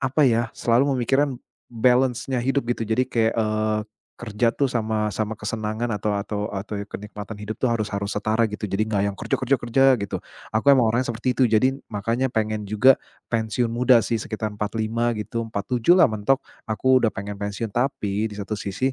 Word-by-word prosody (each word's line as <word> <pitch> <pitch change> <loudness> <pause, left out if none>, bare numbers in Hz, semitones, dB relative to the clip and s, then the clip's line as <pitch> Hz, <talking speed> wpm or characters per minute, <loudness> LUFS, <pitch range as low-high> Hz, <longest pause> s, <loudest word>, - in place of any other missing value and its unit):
apa 130 +4 +2
ya? 115 0 +2
Selalu 120 +3 +2
memikirkan 135 +3 +1 0.4
balance-nya 125 +2 +2
hidup, 135 +2 +1
gitu. 120 - -1
Jadi 110 +4 +1
kayak, 115 -1 +2
eee, 110 0 0 0.4
kerja 115 0 0
tuh 140 - +1
sama 110 -3 -1
sama 110 +2 -2
kesenangan 110 +2 -3
atau 105 +1 -1
atau 100 +1 -3
atau 100 +2 -4 0.2
kenikmatan 105 +1 -7
hidup 105 +1 -5
tuh 130 - +1
harus 110 -3 -1
harus 100 0 -3
setara 110 +2 +1
gitu. 105 +1 -6
Jadi 100 +3 0
nggak 105 -2 0
yang 100 - -14
kerja, - - -7
kerja, 130 +1 +2
kerja, 120 +3 +1 0.2
gitu. 100 -1 -3 0.4
Aku 110 +5 -1
emang 130 -4 +5
orangnya 125 +2 0
seperti 120 +3 -1
itu. 130 - +3
Jadi 130 +5 +2
makanya 115 +6 0
pengen 110 -1 -1
juga, 125 +6 +5 0.4
pensiun 115 +1 0
muda 120 -1 +4
sih, 115 -1 -1
sekitar 110 -1 -4
45 110 +3 -1
gitu, 115 +2 -3
47 120 - +2
lah 175 - +8
mentok, 110 +5 +2 0.3
aku 130 +4 +3
udah 115 - +4
pengen 100 +1 -6
pensiun. 105 +1 -4
Tapi 110 -4 -1
di 105 - -8
satu 100 +1 -5
sisi, 105 +7 -1
110 Hz, 185 wpm, -23 LUFS, 105-125 Hz, 0.4 s, lah